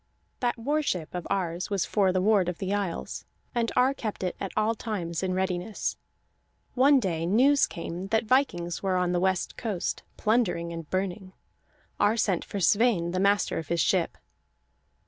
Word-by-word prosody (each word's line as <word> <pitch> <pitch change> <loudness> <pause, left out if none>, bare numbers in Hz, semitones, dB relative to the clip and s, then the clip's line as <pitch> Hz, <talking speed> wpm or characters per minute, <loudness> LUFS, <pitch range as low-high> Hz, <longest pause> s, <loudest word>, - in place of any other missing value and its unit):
That 245 -1 0
war 290 +7 0
ship 180 - -2
of 180 -1 -4
Ar's 175 -2 -1
was 200 -3 0
for 195 -3 +2
the 185 0 0
ward 200 -4 +3
of 175 - -4
the 195 +1 -2
isles, 200 -4 -3 0.3
and 235 -2 0
Ar 255 +2 +4
kept 215 -7 -5
it 180 - -1
at 195 - -4
all 215 +1 +2
times 185 -8 -4
in 185 -1 -1
readiness. 185 +2 -2 0.8
One 270 +2 +5
day 170 -7 -1
news 265 +9 +4
came 170 +2 -6
that 225 +2 +1
vikings 175 -9 +1
were 190 -1 0
on 180 -1 +1
the 175 - +1
west 185 0 0
coast, 210 -7 -2 0.2
plundering 200 -7 +1
and 165 -3 -7
burning. 185 0 -3 0.7
Ar 210 +3 +3
sent 195 -6 +1
for 200 - -5
Sweyn, 195 -2 +3
the 185 - -1
master 200 -1 +2
of 160 - -7
his 170 - 0
ship. 125 - +1
190 Hz, 175 wpm, -27 LUFS, 175-220 Hz, 0.8 s, One